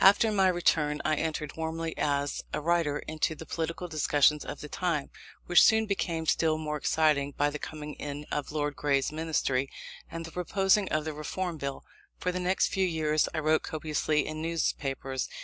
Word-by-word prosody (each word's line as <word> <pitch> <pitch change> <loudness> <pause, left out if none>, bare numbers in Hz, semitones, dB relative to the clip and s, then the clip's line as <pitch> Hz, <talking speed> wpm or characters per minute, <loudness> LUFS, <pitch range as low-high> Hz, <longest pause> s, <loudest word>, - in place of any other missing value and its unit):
After 205 +3 +6
my 195 -2 +4
return 160 -4 +2
I 155 - +3
entered 155 -2 -2
warmly, 160 0 -3
as 145 -1 0
a - - -1
writer, 160 -2 +1
into 155 0 -1
the 160 - -9
political 165 +2 -3
discussions 150 -2 +3
of 145 - -6
the 150 - -7
time; 160 -3 -1 0.3
which 175 - +6
soon 220 0 +5
became 170 -5 -1
still 160 0 +2
more 155 -1 -3
exciting, 150 -2 +2
by 145 0 +2
the 150 - -5
coming 150 0 -6
in 145 0 -6
of 145 -1 -2
Lord 145 -1 -1
Grey's 140 0 +1
Ministry, 155 -4 0 0.4
and 165 0 -6
the 165 - -9
proposing 195 +3 +2
of 155 0 0
the 155 - -3
Reform 165 +3 -3
Bill. 140 -2 -5 0.3
For 180 - -1
the 180 - -3
next 185 +1 +2
few 190 -1 +1
years 155 -2 +1
I 155 - 0
wrote 155 +1 +3
copiously 155 -1 0
in 155 0 -5
newspapers. 135 -5 -2
155 Hz, 185 wpm, -29 LUFS, 150-170 Hz, 0.4 s, After